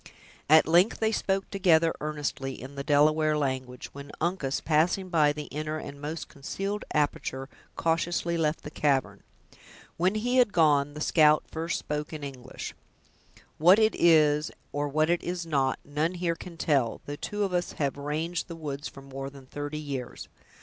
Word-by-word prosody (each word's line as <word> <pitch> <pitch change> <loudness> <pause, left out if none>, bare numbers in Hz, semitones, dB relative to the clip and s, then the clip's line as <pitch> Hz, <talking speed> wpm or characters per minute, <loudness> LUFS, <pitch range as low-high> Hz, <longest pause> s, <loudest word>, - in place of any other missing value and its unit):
At 155 0 +7
length 175 +6 +4
they 220 0 +2
spoke 195 -3 0
together, 170 -4 +4
earnestly, 145 -3 -3
in 130 +2 -9
the 140 0 -5
Delaware 155 +1 +3
language, 130 -3 -3
when 140 0 -9
Uncas, 160 -5 -1
passing 175 +4 +1
by 155 -4 +4
the 150 0 -5
inner 155 +1 -3
and 140 -2 -8
most 155 +2 -5
concealed 195 +9 -4
aperture, 135 -2 -1 0.3
cautiously 170 +1 0
left 160 -1 0
the 150 - -7
cavern. 135 -11 0 0.8
When 185 +4 +2
he 245 +4 0
had 245 -6 +4
gone, 145 -3 +3
the 150 - -6
scout 155 -1 +5
first 165 +1 -2
spoke 150 +1 -4
in 155 -2 -6
English. 130 -3 -7 0.9
"What 175 +6 +7
it 220 -1 +4
is, 155 -2 +4 0.2
or 145 0 -1
what 155 +3 +2
it 175 - +1
is 175 -1 -3
not, 135 -5 +1
none 155 +5 -1
here 175 -1 0
can 170 0 -10
tell, 135 -8 +1
though 145 - -5
two 205 +7 -3
of 195 -2 -1
us 175 0 -1
have 140 -3 -1
ranged 155 +4 -3
the 170 - -7
woods 145 -2 -5
for 135 - -11
more 135 0 -6
than 135 -1 -14
thirty 145 +3 -5
years. 140 -5 -6
155 Hz, 170 wpm, -28 LUFS, 140-170 Hz, 0.9 s, At